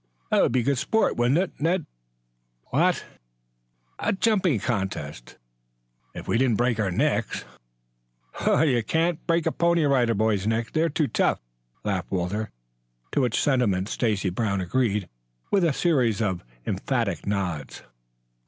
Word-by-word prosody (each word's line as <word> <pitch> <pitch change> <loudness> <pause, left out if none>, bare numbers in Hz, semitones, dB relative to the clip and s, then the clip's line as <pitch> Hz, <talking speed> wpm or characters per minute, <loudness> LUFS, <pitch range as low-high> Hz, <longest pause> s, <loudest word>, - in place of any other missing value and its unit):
"That - - +4
would - - +3
be 125 0 +2
good 140 0 +1
sport, 220 - +1
wouldn't 120 +5 +2
it, 185 +1 0
Ned?" 170 +2 +1 0.9
"What?" - - +2 0.9
"A - - +1
jumping 190 - +2
contest!" 95 - -4 0.8
"If - - -8
we 115 - +1
didn't 125 -5 +2
break 120 -2 +1
our 105 -3 +1
necks." 90 - 0 1.4
"Can't 165 0 0
break 170 -1 +2
a - - +2
Pony 170 -1 +2
Rider 125 -5 +3
Boy's 105 -1 +1
neck. 115 +1 0
They're 160 +1 +1
too 155 -1 0
tough," - - +1 0.4
laughed 100 -4 -2
Walter, 95 +4 -2 0.6
to - - +1
which 125 -3 +1
sentiment, 105 -9 +1
Stacy 105 -5 0
Brown 100 0 -1
agreed 105 0 0 0.4
with 195 -2 +3
a 165 - +3
series 130 - +1
of 95 -5 -1 0.2
emphatic - - -1
nods. 90 -8 -3
120 Hz, 135 wpm, -25 LUFS, 100-155 Hz, 1.4 s, That